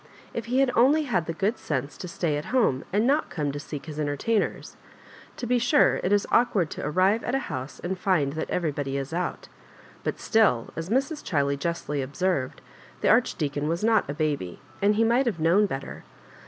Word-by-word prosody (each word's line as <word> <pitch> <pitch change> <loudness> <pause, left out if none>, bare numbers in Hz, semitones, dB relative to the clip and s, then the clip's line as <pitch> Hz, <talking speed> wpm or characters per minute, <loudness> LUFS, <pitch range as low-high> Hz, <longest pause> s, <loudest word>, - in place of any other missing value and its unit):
If 230 - -4
he 250 +3 +2
had 270 -2 +3
only 280 +6 +5
had 195 - -1
the - - -1
good 200 +7 -1
sense 140 -1 -3
to 180 - -6
stay 170 -3 -1
at 150 - -4
home, 220 - +1
and 210 +4 +2
not 285 +4 +2
come 150 -4 -2
to 145 - -5
seek 145 0 -7
his 155 -2 -7
entertainers! 150 +9 -1 0.6
To - - -4
be 245 +1 +2
sure 290 +5 +4
it 185 - 0
is 205 -1 +3
awkward 205 -9 +3
to - - -6
arrive 185 +8 +2
at 245 - -1
a 270 - -2
house 130 +2 -6
and 185 +1 -3
find 165 -8 +1
that 160 - -4
everybody 145 -5 -1
is 135 +3 -4
out; 180 +2 -3 0.6
but - - -3
still, 215 - +2
as 165 +2 -5
Mrs. 275 +6 0
Ohiley 140 -4 0
justly 150 -1 -2
observed, 140 0 -2 0.4
the - - +2
Archdeacon 145 0 +1
was 170 +4 -1
not 220 -7 +3
a 145 - -3
baby, 145 - -2 0.2
and 205 +1 +3
he 225 - +3
might 240 +3 +3
have 200 -8 -1
known 175 +6 +4
better. 135 -6 -6
175 Hz, 200 wpm, -26 LUFS, 145-225 Hz, 0.6 s, only